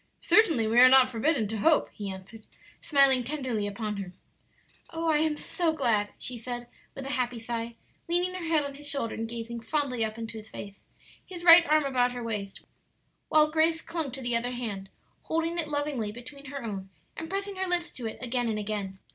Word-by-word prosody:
"Certainly 325 Hz, -, +4 dB
we 225 Hz, +2 st, +3 dB
are 255 Hz, +1 st, +10 dB
not 260 Hz, -1 st, +6 dB
forbidden 240 Hz, 0 st, +1 dB
to 225 Hz, -, -2 dB
hope," 310 Hz, +9 st, +3 dB
he 205 Hz, -2 st, -5 dB
answered, 195 Hz, +3 st, -10 dB, 0.3 s
smiling 275 Hz, -3 st, +4 dB
tenderly 250 Hz, -6 st, -2 dB
upon 210 Hz, 0 st, -4 dB
her. 190 Hz, -2 st, -6 dB, 0.8 s
"Oh, 330 Hz, 0 st, -3 dB
I 305 Hz, -2 st, +3 dB
am 310 Hz, -1 st, +1 dB
so 335 Hz, 0 st, -1 dB
glad!" 225 Hz, -8 st, +1 dB
she 245 Hz, -2 st, -3 dB
said, 240 Hz, +1 st, -5 dB, 0.3 s
with 270 Hz, -, -7 dB
a 275 Hz, -, -4 dB
happy 250 Hz, -3 st, -1 dB
sigh, 230 Hz, 0 st, -4 dB, 0.3 s
leaning 355 Hz, +2 st, +1 dB
her 365 Hz, -2 st, -5 dB
head 320 Hz, -2 st, +3 dB
on 280 Hz, 0 st, -5 dB
his 290 Hz, +1 st, -8 dB
shoulder 275 Hz, -5 st, -2 dB
and 225 Hz, 0 st, -4 dB
gazing 235 Hz, 0 st, -5 dB
fondly 255 Hz, 0 st, -1 dB
up 220 Hz, 0 st, -2 dB
into 225 Hz, 0 st, -6 dB
his 215 Hz, 0 st, -12 dB
face, 200 Hz, 0 st, -9 dB, 0.4 s
his 355 Hz, -2 st, -9 dB
right 335 Hz, 0 st, +9 dB
arm 305 Hz, -1 st, +3 dB
about 250 Hz, -2 st, +1 dB
her 245 Hz, -1 st, -5 dB
waist, 210 Hz, -4 st, -4 dB, 0.7 s
while 305 Hz, 0 st, +4 dB
Grace 320 Hz, +1 st, +3 dB
clung 325 Hz, -4 st, -3 dB
to 270 Hz, -, -6 dB
the 240 Hz, -1 st, 0 dB
other 245 Hz, +2 st, -1 dB
hand, 205 Hz, -6 st, -5 dB, 0.4 s
holding 330 Hz, +1 st, -1 dB
it 320 Hz, -, -1 dB
lovingly 290 Hz, -7 st, -2 dB
between 255 Hz, +5 st, -11 dB
her 280 Hz, -2 st, -6 dB
own 195 Hz, -4 st, -5 dB, 0.3 s
and 325 Hz, 0 st, -6 dB
pressing 395 Hz, +1 st, -3 dB
her 380 Hz, 0 st, -1 dB
lips 350 Hz, -1 st, 0 dB
to 240 Hz, -3 st, -5 dB
it 220 Hz, -, -6 dB
again 245 Hz, -1 st, 0 dB
and 215 Hz, -, -1 dB
again. 205 Hz, -2 st, -4 dB
250 Hz, 205 wpm, -28 LUFS, 225-310 Hz, 0.8 s, are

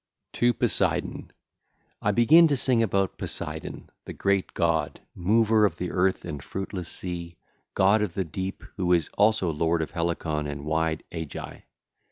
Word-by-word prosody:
XXII. -, -, -9 dB
TO 120 Hz, 0 st, +4 dB
POSEIDON -, -, +1 dB
(ll. -, -, -8 dB
1 -, -, -11 dB
5) -, -, -28 dB, 0.7 s
I 100 Hz, -, +2 dB
begin 150 Hz, +10 st, +6 dB
to 145 Hz, -3 st, +1 dB
sing 125 Hz, -2 st, +3 dB
about 100 Hz, -4 st, 0 dB
Poseidon, 75 Hz, +1 st, -5 dB
the -, -, -7 dB
great 100 Hz, -1 st, 0 dB
god, -, -, 0 dB
mover 110 Hz, +4 st, +3 dB
of 100 Hz, -6 st, +2 dB
the 90 Hz, +1 st, -4 dB
earth 95 Hz, +1 st, +1 dB
and 75 Hz, -5 st, -6 dB
fruitless 95 Hz, -2 st, -4 dB
sea, 85 Hz, -2 st, -4 dB, 0.4 s
god 100 Hz, +3 st, +4 dB
of 100 Hz, -6 st, -2 dB
the 95 Hz, -, -1 dB
deep 95 Hz, +4 st, -5 dB
who 90 Hz, -2 st, +2 dB
is 85 Hz, -4 st, +1 dB
also 105 Hz, -4 st, +3 dB
lord 80 Hz, +1 st, 0 dB
of -, -, -7 dB
Helicon 80 Hz, -3 st, -2 dB
and 70 Hz, 0 st, -6 dB
wide 80 Hz, 0 st, -1 dB
Aegae. 80 Hz, -3 st, -7 dB
90 Hz, 175 wpm, -26 LUFS, 80-105 Hz, 0.7 s, begin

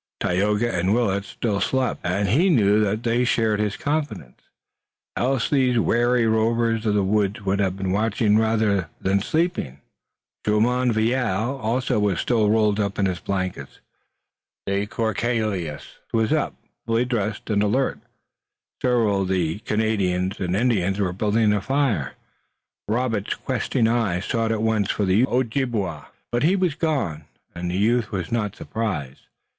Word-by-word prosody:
Tayoga 105 Hz, +6 st, +1 dB
and 90 Hz, +4 st, +1 dB
Willet 100 Hz, -5 st, 0 dB
still 105 Hz, -1 st, -2 dB
slept, 130 Hz, -1 st, 0 dB
and 95 Hz, +3 st, 0 dB
he 165 Hz, -, +3 dB
knew 105 Hz, -, +4 dB
that 105 Hz, +2 st, -1 dB
they 120 Hz, +1 st, +1 dB
shared 110 Hz, -3 st, +1 dB
his 105 Hz, -1 st, -1 dB
confidence, 145 Hz, -, -3 dB, 0.7 s
else 130 Hz, -1 st, 0 dB
these 130 Hz, -4 st, +2 dB
wary 120 Hz, +1 st, +2 dB
rovers 115 Hz, 0 st, +1 dB
of 105 Hz, -, +2 dB
the 100 Hz, -, +2 dB
woods 100 Hz, +1 st, 0 dB
would 100 Hz, +1 st, +1 dB
have 95 Hz, -1 st, 0 dB
been 95 Hz, -1 st, -2 dB
watching 105 Hz, +1 st, +2 dB
rather 110 Hz, -5 st, +1 dB
than 95 Hz, +1 st, +1 dB
sleeping. 155 Hz, -, -1 dB, 0.6 s
Jumonville 115 Hz, +1 st, +1 dB
also 120 Hz, +1 st, 0 dB
was 100 Hz, -5 st, +1 dB
still 110 Hz, -4 st, +2 dB
rolled 105 Hz, -1 st, +2 dB
in 100 Hz, -1 st, 0 dB
his 90 Hz, -3 st, -1 dB
blankets, 95 Hz, -6 st, -4 dB, 0.9 s
but -, -, -3 dB
de 100 Hz, +1 st, 0 dB
Courcelles 110 Hz, -7 st, -2 dB, 0.3 s
was 110 Hz, -1 st, +1 dB
up, -, -, 0 dB, 0.3 s
fully 115 Hz, +2 st, +2 dB
dressed, 110 Hz, -3 st, -2 dB
and 100 Hz, -1 st, +2 dB
alert. 125 Hz, +6 st, +1 dB, 0.8 s
Several 115 Hz, -6 st, +2 dB
of 95 Hz, -, -1 dB
the 90 Hz, -1 st, 0 dB
Canadians 100 Hz, -4 st, -1 dB
and 90 Hz, -1 st, -1 dB
Indians 100 Hz, -4 st, +1 dB
were 95 Hz, -3 st, 0 dB
building 105 Hz, +2 st, +2 dB
a 105 Hz, -, 0 dB
fire. 130 Hz, -, 0 dB, 0.7 s
Robert's 110 Hz, -2 st, -1 dB
questing 115 Hz, -, -1 dB
eye 115 Hz, -6 st, +1 dB
sought 115 Hz, +4 st, -1 dB
at 110 Hz, -1 st, -1 dB
once 110 Hz, -3 st, +1 dB
for 105 Hz, -, 0 dB
the 100 Hz, +7 st, +3 dB
Ojibway, 115 Hz, -, -1 dB, 0.3 s
but 120 Hz, -, 0 dB
he 170 Hz, +6 st, +3 dB
was 180 Hz, -5 st, +1 dB
gone, 140 Hz, -, -2 dB, 0.3 s
and 85 Hz, 0 st, -4 dB
the 90 Hz, -, -2 dB
youth 115 Hz, +2 st, +1 dB
was 90 Hz, -4 st, -4 dB
not 105 Hz, -4 st, -1 dB
surprised. 80 Hz, -, -4 dB
105 Hz, 150 wpm, -23 LUFS, 95-120 Hz, 0.9 s, knew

